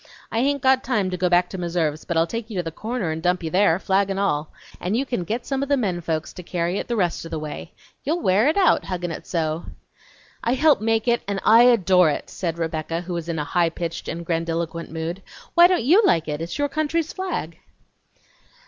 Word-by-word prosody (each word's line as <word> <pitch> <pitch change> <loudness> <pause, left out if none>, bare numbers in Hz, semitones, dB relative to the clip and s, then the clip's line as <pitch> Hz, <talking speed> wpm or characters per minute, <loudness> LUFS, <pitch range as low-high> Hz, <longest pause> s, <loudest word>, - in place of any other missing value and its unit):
I 225 - 0
hain't 280 +2 +1
got 265 0 +4
time 210 -7 0
to - - -1
go 180 0 0
back 175 0 +4
to 190 - -5
Meserve's, 165 -3 -1
but 170 - -2
I'll 165 - +4
take 230 +5 -5
you 210 - -5
to 175 - 0
the 165 - -5
corner 215 0 -3
and 160 +1 -4
dump 180 +1 +1
you 160 - -3
there, 185 -3 +4
flag 195 +1 +1
n' 195 - -2
all, 155 -7 0 0.3
and 195 +5 -1
you 270 - 0
can 240 -9 -2
get 225 +7 -3
some 270 -1 -2
o' 280 - -1
the 285 0 +2
men 190 -8 -1
folks 160 -1 -3
to - - -8
carry 175 +1 -2
it - - -5
the 240 - -1
rest 180 -6 0
o' 165 - -8
the 165 - -3
way. 150 -1 -7 0.3
You'll 315 +5 0
wear 200 +7 +3
it 315 - +2
out, 375 -4 +4
huggin' 175 -2 -3
it - - -8
so!" 160 -1 -2 0.8
"I 235 +2 +1
helped 295 -2 +4
make 225 +1 +1
it 235 0 +2
and 200 -1 -1
I 230 +2 +7
adore 185 -8 +5
it!" 145 - -4
said 170 -3 -3
Rebecca, 165 0 -2
who 180 0 -6
was 170 -1 -4
in 165 - -2
a 150 - -1
high 170 +1 +2
pitched 165 0 -5
and 170 0 -5
grandiloquent 165 0 -2
mood. 165 +4 -4 0.3
"Why 345 0 +8
don't 360 -8 +1
YOU 345 - +6
like 165 - +2
it? 150 0 -3
It's 170 +1 -4
your 290 0 +1
country's 310 +2 -1
flag." 345 - -4
180 Hz, 240 wpm, -23 LUFS, 165-235 Hz, 0.8 s, Why